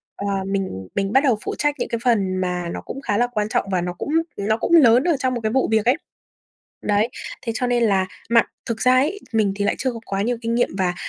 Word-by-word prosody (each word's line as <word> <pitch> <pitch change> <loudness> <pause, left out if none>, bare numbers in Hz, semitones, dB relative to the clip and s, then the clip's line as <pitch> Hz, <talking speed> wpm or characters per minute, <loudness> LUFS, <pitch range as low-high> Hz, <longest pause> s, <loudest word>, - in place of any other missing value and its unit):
ờ, 200 - -5 0.2
mình 190 - -3
mình 195 0 0
bắt 270 +2 +5
đầu 250 -6 +3
phụ - - -3
trách 295 0 +1
những - - -2
cái 235 - -2
phần 200 -6 +2
mà 180 -1 -2
nó - - -5
cũng 270 - -7
khá 205 - -1
là 245 - +2
quan 215 -3 -2
trọng, - - 0
và 180 -2 +1
nó 180 0 -3
cũng 180 - -6 0.3
nó 215 +2 0
cũng - - -3
lớn 250 -4 +6
ở 335 -5 +2
trong 255 -1 0
một 240 - -3
cái 220 0 -1
vụ 265 +1 +2
việc 220 -1 +2
ấy. 250 +3 +4 0.9
Đấy, 210 +2 +2 0.3
thế 230 - -2
cho 250 - 0
nên 240 -1 +1
là 195 -4 +2 0.2
mà 235 0 +6 0.2
thực 225 -1 -3
ra 255 - +4
ấy, 305 +11 +1
mình 215 -3 +2
thì 205 - -1
lại 205 - +2
chưa 260 -2 -1
có 230 - -7
quá 195 0 -1
nhiều 240 +2 0
kinh 230 0 -2
nghiệm, 240 - +2
và, 180 -1 +1
225 Hz, 265 wpm, -22 LUFS, 195-250 Hz, 0.9 s, lớn